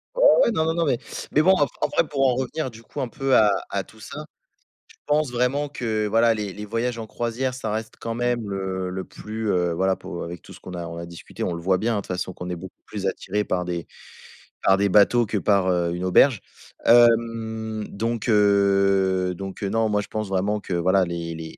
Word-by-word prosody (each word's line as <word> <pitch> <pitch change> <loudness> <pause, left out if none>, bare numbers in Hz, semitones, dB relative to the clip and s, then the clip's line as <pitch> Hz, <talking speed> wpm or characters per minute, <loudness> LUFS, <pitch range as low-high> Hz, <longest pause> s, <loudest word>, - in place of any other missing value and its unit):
Oh - - +6
ouais, - - +3
non, 160 -6 +1
non, 160 - +1
non 170 -1 +1
mais, 125 -5 +1 0.3
mais 150 - +4
bon, 190 +3 +5
ap 145 -5 +2
après - - +1
pour 135 -2 +1
en 125 - +1
revenir 130 +3 -2
du 115 -1 -14
coup - - -6
un 130 - -1
peu 135 +2 0
à 105 -2 +6 0.2
à - - -2
tout - - -19
ça, - - -8 0.6
je - - -20
pense 150 -3 +1
vraiment 125 +4 0
que 110 -6 -2
voilà 115 +2 +4
les 105 -3 -4
les 105 +2 -7
voyages 115 +3 -2
en 110 -1 -6
croisière 120 +3 -2
ça 115 -4 -4
reste 110 +1 -4
quand 115 0 -4
même, 120 -1 0
heu, 95 -1 -3
le 95 0 -4
plus, 110 0 -5
heu, 90 -2 +1
voilà 95 +3 +1
pour 85 -1 -7
avec 85 -1 -7
tout - - -15
ce - - -13
qu'on 90 - -10
a 85 -1 -5
on 85 - -7
a 85 - -5
discuté, 85 0 -8
on 90 - -1
le 85 - -5
voit 95 +2 +2
bien, 115 +4 0
hein, - - 0
de 100 - -1
toute - - -15
façon 95 - -4
qu'on 90 0 -7
est 90 - -2
beaucoup 95 +2 -11
plus 100 -2 -6
attirés 105 +2 -2
par 90 -1 -1
des, 85 -1 -4 0.7
par 95 0 +4
des 100 0 +2
bateaux 105 +5 +5
que 105 0 -2
par, 100 -2 +2
heu, 85 -1 +1
une 90 - -4
auberge. 110 +5 +4 0.4
Hem, 115 -2 +3
donc 115 +2 -2
heu, 100 -3 +3
donc 95 +2 -7
heu, 100 - 0
non, 110 +1 +1
moi 105 -1 +1
je - - -9
pense 110 -1 -3
vraiment 100 +2 0
que 95 - -6
voilà 95 +3 +3
les, 85 -1 -4
les 80 0 -8
105 Hz, 240 wpm, -24 LUFS, 95-120 Hz, 0.7 s, Oh